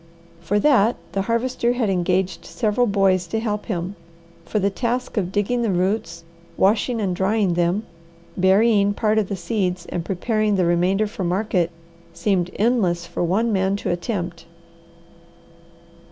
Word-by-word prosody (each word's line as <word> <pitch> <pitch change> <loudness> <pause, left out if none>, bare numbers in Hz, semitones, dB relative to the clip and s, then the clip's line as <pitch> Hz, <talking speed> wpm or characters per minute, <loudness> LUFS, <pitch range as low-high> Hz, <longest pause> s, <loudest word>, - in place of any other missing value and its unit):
For 170 +5 -1
that 240 -4 +4 0.2
the 195 - -1
Harvester 235 +3 0
had 245 -3 0
engaged 180 -1 0
several 235 +1 0
boys 195 -3 +2
to 220 - -2
help 210 -2 -3
him, 185 -2 -3 0.5
for 190 - -2
the 200 0 +1
task 245 +4 -2
of 185 -4 -1
digging 210 +5 0
the 230 - 0
roots, 180 -2 -1 0.3
washing 225 +4 +2
and 190 -4 -1
drying 195 0 +1
them, 175 +5 0 0.5
burying 200 +2 +3
part 215 0 +2
of 205 - -2
the 200 - -2
seeds 180 -1 -2
and 175 - -4
preparing 210 +3 0
the 185 -2 +2
remainder 180 +5 +2
for 205 -2 -5
market 180 -1 0 0.4
seemed 185 -4 0
endless 200 -7 +1
for 170 - -3
one 215 +7 +1
man 190 0 +1
to 200 - -2
attempt. 175 -2 -4
200 Hz, 150 wpm, -22 LUFS, 180-220 Hz, 0.5 s, that